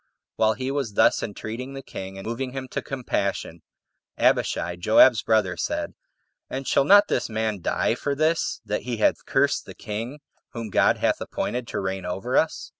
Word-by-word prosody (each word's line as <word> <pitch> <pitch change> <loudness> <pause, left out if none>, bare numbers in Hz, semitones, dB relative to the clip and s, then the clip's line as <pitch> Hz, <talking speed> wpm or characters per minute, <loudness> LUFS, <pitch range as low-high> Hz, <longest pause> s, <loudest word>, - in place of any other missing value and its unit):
While 110 0 +3
he 130 +3 -3
was 135 -7 -2
thus - - +4
entreating 115 +5 -6
the 135 - -7
king, 95 0 -8
and 95 - -8
moving 125 +3 -3
him 135 -1 -5
to - - -3
compassion, 100 -9 -3 0.6
Abishai, 85 +1 +1
Joab's 110 +6 +5
brother, 105 -5 +2
said, 85 - -3 0.6
"And 135 0 -5
shall 140 - +3
not 205 +4 +7
this - - -1
man 110 -3 -2
die - - +1
for 140 -1 -2
this, 155 +3 0
that 105 - -2
he 120 -2 -4
hath 110 - +2
cursed - - +1
that - - -11
king 115 +7 -5 0.3
whom 115 -3 -5
God - - +4
hath - - 0
appointed 125 -1 -3
to - - -3
reign 95 0 -3
over 95 +8 -3
us?" 160 - +1
115 Hz, 180 wpm, -25 LUFS, 100-135 Hz, 0.6 s, not